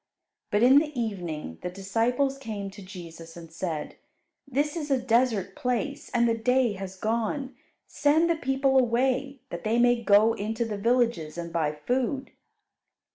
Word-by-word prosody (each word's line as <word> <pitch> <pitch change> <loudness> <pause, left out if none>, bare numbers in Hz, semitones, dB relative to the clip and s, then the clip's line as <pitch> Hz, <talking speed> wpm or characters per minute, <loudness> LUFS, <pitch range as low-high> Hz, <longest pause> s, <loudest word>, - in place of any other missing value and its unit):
But 210 +1 +2
in 265 +3 +8
the 300 -4 -3
evening 175 - -4
the 180 - -3
disciples 230 +9 0
came 210 -6 -5
to 200 - -12
Jesus 170 -3 -10
and 165 -1 -11
said, 165 -3 -4 0.5
"This 285 +3 0
is 305 -3 -4
a 270 - +3
desert 235 -4 +1
place, 275 +4 -2
and 235 0 +2
the 230 - +2
day 250 0 +2
has 190 -1 -7
gone; 230 +7 -2 0.3
send 310 +3 +2
the 335 - +2
people 270 -2 +2
away, 260 +2 0
that 170 0 -6
they 220 +2 +1
may 245 0 +4
go 215 +1 +5
into 220 +2 -2
the 210 -2 -4
villages 230 -9 +1
and 170 -1 -6
buy 160 -3 +1
food." 255 - -2
230 Hz, 160 wpm, -27 LUFS, 195-265 Hz, 0.5 s, in